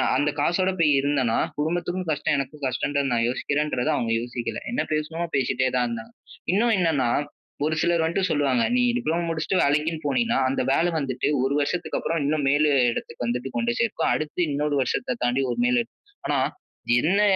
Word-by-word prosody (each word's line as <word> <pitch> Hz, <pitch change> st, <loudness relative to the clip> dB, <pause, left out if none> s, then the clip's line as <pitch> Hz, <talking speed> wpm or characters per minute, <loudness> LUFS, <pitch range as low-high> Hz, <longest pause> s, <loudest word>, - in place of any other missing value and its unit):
அந்த 145 Hz, +3 st, +2 dB
காசோட 180 Hz, +5 st, +2 dB
போய் 155 Hz, -3 st, +4 dB
இருந்தேனா, 135 Hz, -5 st, +1 dB, 0.2 s
குடும்பத்துக்கும் 175 Hz, +4 st, -2 dB
கஷ்டம் 150 Hz, -1 st, +1 dB
எனக்கும் 140 Hz, +2 st, -5 dB
கஷ்டன்ற 140 Hz, +3 st, -1 dB
நான் 115 Hz, -1 st, +2 dB
யோசிக்கிறேன்றத 145 Hz, +1 st, -1 dB
அவங்க 115 Hz, -4 st, -1 dB
யோசிக்கல. 120 Hz, 0 st, -4 dB
என்ன 245 Hz, -, 0 dB
பேசணுமோ 155 Hz, +2 st, -1 dB
பேசிட்டே 130 Hz, -1 st, +1 dB
தான் 125 Hz, -1 st, +2 dB
இருந்தாங்க. 115 Hz, -1 st, -6 dB, 0.4 s
இன்னும் 225 Hz, +4 st, +3 dB
என்னனா, 160 Hz, -9 st, +2 dB, 0.6 s
ஒரு 155 Hz, +1 st, 0 dB
சிலர் 170 Hz, -1 st, +2 dB
வந்துட்டு 180 Hz, +4 st, 0 dB
சொல்லுவாங்க, 135 Hz, -5 st, +2 dB
"நீ 250 Hz, -, +3 dB, 0.2 s
டிப்ளோமா 170 Hz, -4 st, -1 dB
முடிச்சுட்டு 165 Hz, +3 st, 0 dB
வேலைக்கினு 150 Hz, +3 st, +1 dB
போனீனா 235 Hz, -, +1 dB
அந்த 135 Hz, -, 0 dB
வேல 170 Hz, +3 st, +2 dB
வந்துட்டு 130 Hz, -3 st, -2 dB, 0.2 s
1 135 Hz, +2 st, +1 dB
வருஷத்துக்கு, 175 Hz, +5 st, -2 dB
அப்புறம் 165 Hz, -1 st, -1 dB
இன்னும் 145 Hz, -1 st, 0 dB
மேலு 150 Hz, +1 st, +3 dB, 0.2 s
இடத்துக்கு 120 Hz, -, -5 dB
வந்துட்டு 125 Hz, +2 st, -2 dB
கொண்டு 120 Hz, 0 st, 0 dB
சேர்க்கும். 235 Hz, -2 st, 0 dB
அடுத்து 155 Hz, +3 st, -4 dB
இன்னொரு 145 Hz, 0 st, 0 dB
வருஷத்த 125 Hz, -1 st, -2 dB
தாண்டி 125 Hz, +3 st, +1 dB
ஒரு 240 Hz, -, -1 dB
நிலை. 245 Hz, -2 st, +2 dB, 0.4 s
ஆனா -, -, +1 dB, 0.6 s
என்ன 190 Hz, +8 st, +2 dB
150 Hz, 165 wpm, -24 LUFS, 130-170 Hz, 0.6 s, போய்